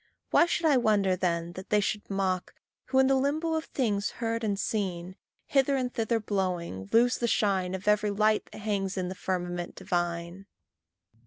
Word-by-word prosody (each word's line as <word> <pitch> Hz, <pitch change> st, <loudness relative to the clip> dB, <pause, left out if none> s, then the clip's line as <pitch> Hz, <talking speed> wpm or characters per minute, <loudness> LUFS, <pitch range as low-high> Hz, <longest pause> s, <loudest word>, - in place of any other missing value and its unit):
Why 340 Hz, -, +5 dB
should 340 Hz, 0 st, -1 dB
I 295 Hz, -4 st, +5 dB
wonder 205 Hz, -5 st, +3 dB
then 170 Hz, -2 st, -1 dB
that 185 Hz, +1 st, -9 dB
they 210 Hz, -, +4 dB
should 205 Hz, +1 st, -2 dB
mock, 190 Hz, -2 st, -1 dB, 0.3 s
Who, 260 Hz, 0 st, -1 dB
in 265 Hz, -, +6 dB
the 270 Hz, -, +3 dB
limbo 295 Hz, +5 st, +1 dB
of 320 Hz, 0 st, -1 dB
things 210 Hz, -6 st, -1 dB
heard 230 Hz, 0 st, -2 dB
and 200 Hz, -2 st, -1 dB
seen, 185 Hz, -4 st, -2 dB, 0.3 s
Hither 275 Hz, 0 st, +2 dB
and 255 Hz, -2 st, -1 dB
thither 230 Hz, -1 st, 0 dB
blowing, 180 Hz, -, -3 dB
lose 240 Hz, +2 st, +4 dB
the 235 Hz, -, +1 dB
shine 190 Hz, -4 st, +1 dB
Of 190 Hz, +2 st, -8 dB
every 210 Hz, 0 st, +3 dB
light 215 Hz, +1 st, +2 dB
that -, -, -10 dB
hangs 200 Hz, -2 st, -2 dB
in 180 Hz, -1 st, -1 dB
the -, -, -4 dB
firmament 175 Hz, -2 st, -3 dB
divine. 175 Hz, +2 st, -3 dB
205 Hz, 180 wpm, -28 LUFS, 185-235 Hz, 0.3 s, in